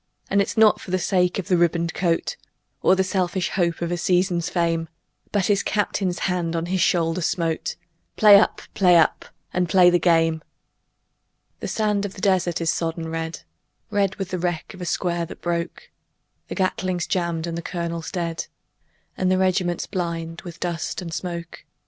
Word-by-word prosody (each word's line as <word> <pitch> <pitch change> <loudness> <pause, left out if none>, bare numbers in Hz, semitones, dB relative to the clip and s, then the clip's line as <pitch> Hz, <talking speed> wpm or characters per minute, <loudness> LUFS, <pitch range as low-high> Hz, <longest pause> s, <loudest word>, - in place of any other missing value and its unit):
And 200 +1 +4
it's 200 - -3
not 220 -1 +5
for - - -10
the 185 - +1
sake 180 -1 +1
of 195 0 -4
a - - +6
ribboned 170 -1 +1
coat 170 - 0 0.5
Or 185 - +5
the 190 - +2
selfish 185 -1 -1
hope 170 -2 0
of 170 - -2
a 175 - 0
season's 180 -1 +1
fame, 165 -2 0 0.4
But 200 -3 +1
his 200 -1 +2
Captain's 195 -3 -1
hand 175 -3 -1
on 165 0 -1
his 185 +1 0
shoulder 165 +1 +2
smote; 165 -1 -1 0.4
"Play 205 -2 +8
up! 215 - 0
Play 180 -3 +5
up! 160 - +2 0.3
And 180 -1 0
play 180 -1 +6
the 175 - +3
game!" 165 -2 +3 1.2
The - - -4
sand 210 -2 0
of 200 -1 -5
the 190 - -9
desert 185 -4 +2
is 165 -1 +2
sodden 165 -1 -3
red 165 0 -4 0.5
Red 200 -2 +1
with 195 -2 -5
the 185 - -3
wreck 175 -2 -3
of 185 - -11
a - - -3
square 170 0 -1
that - - -10
broke; 170 0 -3 0.6
The - - -5
Gatling's 185 -2 -1
jammed 170 -3 -1
and 170 -1 -4
the 170 - -3
colonel 170 -1 -4
dead, 170 -3 -3 0.7
And 185 - 0
the 185 - +3
regiment's 185 -2 +1
blind 170 -3 -4
with 170 -1 -10
dust 175 +1 -3
and 165 -2 -6
smoke. 170 0 -5
175 Hz, 180 wpm, -23 LUFS, 170-185 Hz, 1.2 s, Play